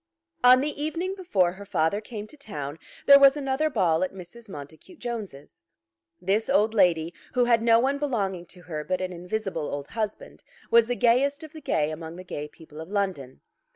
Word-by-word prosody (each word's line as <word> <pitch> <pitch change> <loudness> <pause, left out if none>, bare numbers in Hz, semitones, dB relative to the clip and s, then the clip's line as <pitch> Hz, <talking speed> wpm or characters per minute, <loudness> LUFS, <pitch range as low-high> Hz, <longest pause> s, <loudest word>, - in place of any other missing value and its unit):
On 250 +1 +8
the 290 0 -3
evening 345 +5 -2
before 205 - +1
her 190 +3 -10
father 185 +1 0
came 215 -1 -7
to 215 - -15
town 155 - -7 0.3
there 280 0 +9
was 275 +1 +7
another 280 +2 0
ball 180 - +2
at 185 - -2
Mrs. 200 +5 -12
Montacute 160 - -11
Jones's. 210 - -7 0.6
This 200 +6 0
old 220 -5 +3
lady, 175 -5 +3 0.2
who 250 -1 +4
had 235 -2 +3
no 230 0 +5
one 275 +3 +1
belonging 195 -11 -2
to 180 +1 -14
her 155 -2 -5
but 185 +3 -1
an 185 0 -3
invisible 180 -2 -3
old 145 0 -5
husband, 215 -2 -5 0.3
was 230 -1 +6
the 245 - -1
gayest 265 +5 +2
of 310 0 -11
the 315 - -10
gay 150 - 0
among 160 +1 -7
the 185 - -9
gay 150 -4 -6
people 155 0 -13
of 160 - -9
London. 190 -11 -3
205 Hz, 190 wpm, -26 LUFS, 170-250 Hz, 0.6 s, there